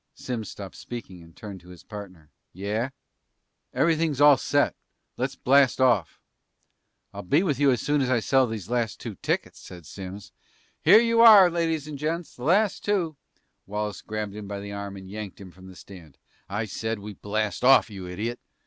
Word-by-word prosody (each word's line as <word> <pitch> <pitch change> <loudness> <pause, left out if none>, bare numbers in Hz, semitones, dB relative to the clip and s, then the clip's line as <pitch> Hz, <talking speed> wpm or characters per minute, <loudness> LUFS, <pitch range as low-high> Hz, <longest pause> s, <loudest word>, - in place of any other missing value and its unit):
Simms 115 -5 -5
stopped 100 -2 -9
speaking 115 -7 -8
and 85 0 -17
turned 100 -3 -9
to 90 - -17
his 90 -1 -13
partner. 95 -7 -10 0.2
"Yeah?" 105 +7 -2 0.8
"Everything's 160 -4 +1
all 145 -1 +8
set. - - +1 0.4
Let's - - -3
blast 135 -1 +3
off!" 120 -9 +2 0.9
"I'll - - -6
be 145 - +2
with 150 -8 -1
you 145 -1 +4
as 125 -3 +1
soon 145 -1 +1
as 130 - 0
I 130 -2 +3
sell 130 +3 +2
the 110 -1 -4
last 120 -1 -1
two 115 - -6
tickets," - - -2
said 90 -3 -12
Simms. 95 +2 -9 0.5
"Here 215 - +8
you 230 -1 +3
are, 205 -6 +9
ladies 165 -3 -1
and 145 -2 -7
gents, 165 +3 -3
the 120 - -11
last 200 +5 +2
two 180 -7 0 0.3
" - - -49
Wallace 105 0 -4
grabbed 105 -2 -5
him 105 -1 -8
by 100 0 -5
the 100 0 -7
arm 100 -1 -6
and 95 -1 -11
yanked 105 0 -7
him 95 -2 -11
from 95 +1 -15
the 95 - -12
stand. 90 -7 -14 0.3
"I 105 +3 -2
said 110 +3 -3
we 105 +1 -8
blast 105 +2 -3
off, 130 -3 +6
you 95 -3 -8
idiot! 110 +7 -4
110 Hz, 190 wpm, -25 LUFS, 100-145 Hz, 0.9 s, are